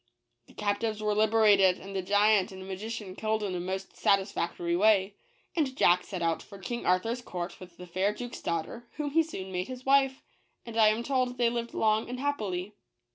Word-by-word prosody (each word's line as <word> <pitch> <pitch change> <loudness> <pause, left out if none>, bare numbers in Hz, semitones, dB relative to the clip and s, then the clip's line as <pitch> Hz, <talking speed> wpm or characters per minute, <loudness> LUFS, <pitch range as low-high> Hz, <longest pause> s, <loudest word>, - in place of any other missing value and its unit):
The - - -19
captives 210 +1 -1
were 210 0 +1
liber 220 +1 +3
ated, 195 -3 +6
and 195 +1 -9
the 190 - 0
giant 205 +1 +3
and 190 0 -9
magician 205 0 -6
killed 220 0 -1
in 195 -2 -2
a 180 - -2
most 190 +2 -5
satisfactory 175 -3 0
way; 200 0 +4 0.4
and 280 -5 0
Jack 180 +1 +4
set 180 -3 -4
out 165 -1 0
for 200 - -12
King 235 +6 -5
Arthur's 225 +7 +1
court 180 -5 -6
with 180 -2 -13
the 180 - -9
fair 185 +3 0
duke's 245 +3 -7
daughter, 170 +9 -3
whom 295 -2 -3
he 325 +3 +4
soon 195 -13 -6
made 180 +1 -2
his 255 0 -8
wife, 270 -1 +3 0.4
and 230 -2 -8
I 220 -1 +6
am 215 +2 +2
told 255 -1 0
they 235 -1 +3
lived 235 0 -4
long 215 +1 +2
and 250 +1 -5
happily. 210 -9 -2
210 Hz, 200 wpm, -29 LUFS, 185-235 Hz, 0.4 s, ated